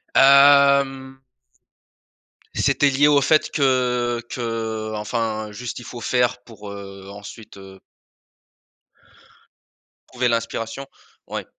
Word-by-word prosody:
Hem 140 -1 +5 1.3
c'était 140 +1 +2
lié 140 +2 +3
au 145 -1 +4
fait 155 +3 +2
que 125 -3 0
que 110 -2 -4
enfin, 110 0 -3
juste 120 +4 -7
il 120 - -12
faut 120 - -9
faire 125 +1 0
pour, 105 -4 -12
heu, 100 -1 -10
ensuite, 100 +1 -12
heu 95 0 -13 2.3
trouver 125 -1 -1
l'inspiration, 115 +2 -3 0.4
ouais. - - -5
120 Hz, 100 wpm, -21 LUFS, 110-135 Hz, 2.3 s, Hem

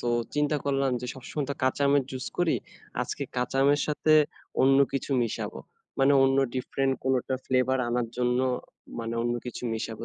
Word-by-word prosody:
তো 120 - -2 0.3
চিন্তা 150 0 +1
করলাম 135 -1 +1
যে 125 - -5
সবসময় 135 +2 -4
তো 140 - -1
কাঁচা 130 +2 +1
আমের 140 -1 +3
জুস 130 -1 -5
করি 175 -2 +3 0.5
আজকে - - -4
কাঁচা 125 +2 -1
আমের 145 +1 +4
সাথে 155 +1 +3 0.5
অন্য 135 +1 +5
কিছু 135 - -3
মিশাবো। 115 - -3 0.4
মানে 135 +1 +5
অন্য 135 0 +3 0.2
ডিফারেন্ট 135 +1 0
কোনো 130 0 +2
একটা 130 - -2
ফ্লেভার 130 0 +2
আনার 120 -1 0
জন্য 125 0 +1 0.6
মানে 115 0 -3
অন্য 120 0 0
কিছু 125 - -6
মিশাবো। 110 0 -4
130 Hz, 175 wpm, -27 LUFS, 125-140 Hz, 0.6 s, অন্য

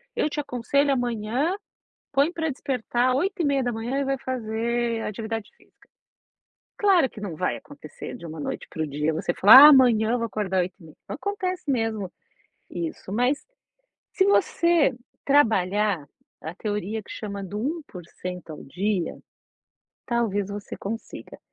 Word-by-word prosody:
eu 305 - +1
te 295 - -2
aconselho 280 +2 +1
amanhã, 245 - -1 0.6
põe 280 +4 +3
para 320 -2 -2
despertar 255 -2 0
8:30 285 -3 +1
da 245 - -1
manhã 235 +5 -3
e 280 - 0
vai 270 0 0
fazer 235 -2 -2
atividade 220 0 -4
física". - - -29 1.0
Claro 380 -9 +4
que 215 - -12
não 195 -5 -4
vai 180 - -1
acontecer 285 -2 -10
de 170 - -9
uma 160 0 -8
noite 145 - -4
para 160 - -3
o 155 - -1
dia 150 +2 -1
você 165 +2 -1
falar: 260 +9 +10
"Amanhã 240 -6 +5
eu 245 - +1
vou 230 - -1
acordar 195 -3 -1
8:30", 175 -3 -9
não - - -4
acontece 370 -2 -3
mesmo 225 -6 -1 0.6
isso, 175 +2 -5
mas 250 +6 +1 0.7
se 380 - +3
você 340 -7 +3 0.3
trabalhar 210 - +2 0.4
a 160 +3 -7
teoria 210 +1 -3
que - - -12
chama 200 -2 -5
do 200 +2 -6
1% 180 - -6
ao 155 - -8
dia, 185 +4 -2 0.9
talvez 210 -5 0
você 205 0 -7
consiga. 225 +3 -7
230 Hz, 145 wpm, -25 LUFS, 200-275 Hz, 1.0 s, falar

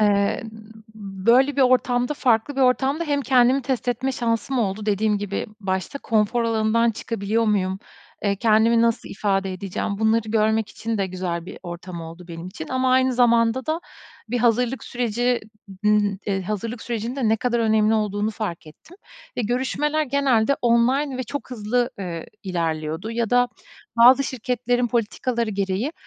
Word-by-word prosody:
Eee, 205 +3 +2
ııı, 220 - -12 0.6
böyle 265 +4 +5
bir 275 - +4
ortamda, 250 +1 +2
farklı 250 +1 +1
bir - - 0
ortamda, 270 +5 +2
hem 290 -2 0
kendimi 260 0 +3
test 255 -1 -2
etme 260 +3 0
şansım 235 +2 -1
oldu. 210 -1 -1
Dediğim 210 0 +1
gibi 200 +2 -3
başta, 190 +7 -3
konfor 225 +1 +1
alanından 230 +1 +2
çıkabiliyor 225 0 -2
muyum? 190 -3 0 0.5
Eee, 200 -1 +1
kendimi 230 +1 +4
nasıl 230 -1 0
ifade 195 -2 -1
edeceğim, 200 +2 -4
bunları 220 0 +2
görmek 220 0 +1
için 225 0 -4
de 195 - +1
güzel 180 -2 -4
bir - - -9
ortam 175 0 -7
oldu 165 +2 -10
benim 165 0 -7
için. 185 -4 -8
Ama 255 0 +1
aynı 260 0 +3
zamanda 235 +1 +3
da 320 +2 -1 0.5
bir 245 +2 -1
hazırlık 245 +2 +1
süreci 245 0 0 0.4
nı 210 -2 +2 0.3
hazırlık 220 +3 -4
sürecinin 235 +2 -4
de 245 -5 +1
ne 220 - +3
kadar 240 +1 0
önemli 220 -1 +3
olduğunu 210 0 0
fark 205 -7 -5
ettim 315 - -16 0.4
ve 245 - 0
görüşmeler 265 +6 0
genelde 275 -2 +2
online 255 +4 +2
ve 255 - -2
çok 260 +3 -6
hızlı, 245 +2 -1
ııı, 170 -3 -5 0.2
ilerliyordu. 165 0 -3
Ya 230 -1 -1
da 245 0 +4 0.5
bazı 250 +4 +7
şirketlerin 245 0 -1
politikaları 235 0 -1
gereği, 200 +7 -1
230 Hz, 155 wpm, -23 LUFS, 205-250 Hz, 0.6 s, bazı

